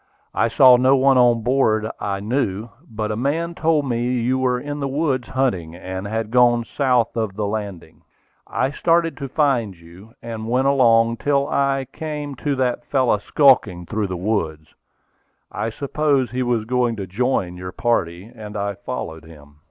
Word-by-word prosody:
I - - +2
saw 125 +2 +6
no 130 +2 +4
one 135 -1 +4
on 120 -2 +3
board 115 -3 +2
that 110 - -4
I 100 -1 -3
knew, 110 -2 -2 0.2
but 110 -1 -3
a - - -2
man 155 +8 -1
told 160 -4 +1
me 120 -2 -1 0.2
you 125 +3 0
were 125 -1 +1
in 145 +2 -5
the 140 - -2
woods 135 -3 -1
hunting, 95 -12 -1
and 95 +2 -6
had 110 +1 -3
gone 120 -1 +4
south 125 -1 0
of 110 -4 -2
the 105 0 -2
landing. 100 -4 -6 0.5
"I 135 - -1
started 165 +2 +1
to 140 -2 -6
find 130 -9 +1
you; 90 +7 -16
and 115 -1 -6
went 130 +2 +1
along 115 -4 +4
till 140 +1 +1
I 135 -1 0
came 150 -2 -5
to 145 +1 -1
that 125 -2 -1
fellow 130 -6 +1
skulking 105 - +3
through 105 +2 -2
the 90 -1 -4
woods. 80 -6 -3 0.8
I 115 - -3
supposed 140 0 0
he 130 +1 -2
was 120 -3 0
going 120 -1 0
to 100 -3 -5
join 95 -2 -1
your 90 0 -7
party, 90 -5 -1
and 110 -2 -9
I 100 0 -2
followed 85 -6 -6
him. 75 -2 -16
120 Hz, 175 wpm, -21 LUFS, 105-135 Hz, 0.8 s, saw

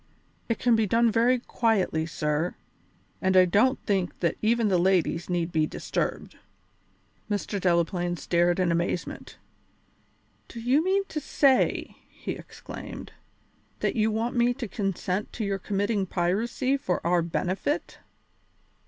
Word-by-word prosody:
It 230 - +1
can 240 -2 +3
be 220 -1 +2
done 230 +3 +3
very 240 +3 +3
quietly, 210 -9 0
sir, 150 +2 -1 0.7
and 190 -1 +3
I 185 - +8
don't 215 +9 +3
think 190 -4 -1
that 170 -2 +1
even 230 +1 +2
the 185 -3 +3
ladies 175 -2 +1
need 175 -1 -1
be 155 -2 +2
disturbed." - - -3 0.9
Mr. 205 -1 -2
Delaplaine 175 0 +1
stared 175 +2 +1
in 180 -2 +2
amazement. 170 +1 -3 1.1
"Do 235 - -9
you 255 +7 +2
mean 390 +2 +1
to 305 - -3
say," 275 -3 +2
he - - -6
exclaimed, - - -9 0.7
"that - - 0
you 220 -1 +2
want 225 +3 -1
me 240 0 +3
to 245 -3 -5
consent 195 -1 -2
to 220 - -3
your 195 -1 -1
committing 200 0 -1
piracy 225 +10 0
for 180 -11 -2
our 175 0 +3
benefit?" 185 - -2
195 Hz, 135 wpm, -27 LUFS, 175-235 Hz, 1.1 s, I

